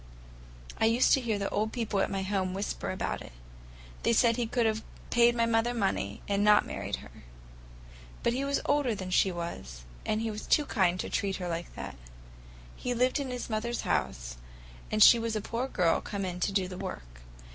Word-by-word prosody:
I - - +4
used 230 +3 +4
to 270 - +4
hear 225 -4 -1
the 200 0 -2
old 215 +2 0
people 225 -5 -1
at - - +1
home 190 -1 -1
whisper 200 +1 -3
about 185 - -2
it. - - -10 0.7
They 235 - +2
said 230 0 +4
he 240 -1 -1
could 235 +1 +1
have 220 0 +1 0.3
paid 240 0 +5
my 230 -1 +2
mother 230 +1 +1
money, 190 - -1
and 200 0 +1
not 210 0 +6
married - - -3
her. - - -14 1.1
But 235 - +2
he 265 +3 -1
was 280 0 0
older 285 -6 +2
than 185 -2 -6
she 190 +1 +4
was, 170 - -6 0.2
and 215 - 0
he 225 -1 -1
was 210 0 -7
too 300 - +4
kind 185 -7 +1
to - - -5
treat 195 -1 0
her 180 -1 -4
like 170 0 -4
that. - - -7 0.8
He 245 0 -3
lived 255 +4 +2
in 275 -2 -3
his 250 -1 -4
mother's 230 +2 -2
house, - - -2 0.5
and 215 0 +6
she 235 - +9
was 230 -1 -2
a - - +1
poor 235 +5 -3
girl 180 -9 +2
come 200 -1 -4
in 180 -1 -4
to 200 - 0
do 195 -2 +1
the 180 0 -7
work. - - -7
210 Hz, 205 wpm, -29 LUFS, 185-235 Hz, 1.1 s, she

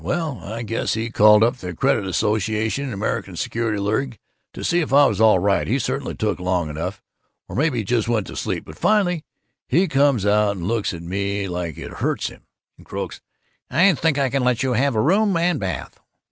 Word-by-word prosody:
Well, 160 - -2
I 110 +5 -5
guess 115 -1 -1
he 115 +1 -3
called 105 0 +6
up 120 +3 +2
the 90 -6 -7
Credit 100 +4 +1
Association 110 +6 0
and 130 - -4
the - - -6
American 100 - -3
Security 115 -2 -2
League 110 +5 -1 0.4
to - - -7
see 175 - +2
if 160 - -2
I 140 +1 +7
was 125 - 0
all 110 -3 +6
right 100 +2 +1
he 125 - +1
certainly 130 - -3
took - - -1
long 90 -3 -1
enough 90 +6 -5 0.4
or - - -8
maybe 145 -1 +1
he 110 - -1
just 115 +2 0
went 115 -4 0
to - - -9
sleep; - - -3
but 80 - -12
finally 180 -7 +2 0.4
he 175 +8 +3
comes 140 -7 +2
out 105 0 +3
and 90 0 -4
looks 115 -1 0
at 85 -1 -7
me 100 +3 -2
like 90 -4 -4
it - - -7
hurts - - 0
him, - - -15 0.4
and - - -17
croaks, - - -5 0.5
'I 180 +8 +4
think 155 -1 +1
I 135 -3 +1
can 135 -1 0
let 125 -1 +1
you 130 -1 +1
have 130 +2 +1
a - - +2
room 195 - +3
with 170 -1 +1
bath. 95 -3 -5
115 Hz, 215 wpm, -22 LUFS, 100-140 Hz, 0.5 s, I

